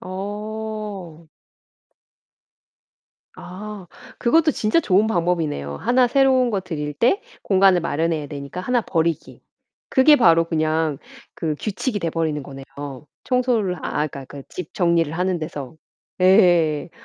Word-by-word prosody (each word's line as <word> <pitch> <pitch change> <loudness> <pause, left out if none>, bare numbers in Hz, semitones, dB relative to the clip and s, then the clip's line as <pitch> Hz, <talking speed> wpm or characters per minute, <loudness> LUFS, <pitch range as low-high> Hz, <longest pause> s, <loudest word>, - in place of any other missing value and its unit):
어. 205 -3 -6 2.1
아 200 +1 -9 0.3
그것도 320 +6 +3
진짜 225 +3 +1
좋은 205 - +3
방법이네요. 165 - -1
하나 250 - +3
새로운 260 -1 +3
거 200 -3 -1
들일 150 -5 -5
때 250 - +2 0.2
공간을 190 -2 +4
마련해야 160 -1 -1
되니까 140 +4 -7
하나 245 +5 +1
버리기. 165 -6 -2 0.5
그게 280 +3 +6
바로 165 - +5
그냥 155 -2 0 0.4
그 155 -2 -2
규칙이 215 +2 -2
돼 170 - -1
버리는 160 -2 -1
거네요. 135 0 -10 0.6
청소를 245 -7 +1
아 - - -5 0.2
그러니까, 140 -2 -9
그러니까 140 +1 -10
집 180 -4 -8
정리를 170 -3 +2
하는 180 +2 0
데서. 150 -3 -6 0.5
예. 175 -6 +4
180 Hz, 270 characters per minute, -22 LUFS, 160-215 Hz, 2.1 s, 그게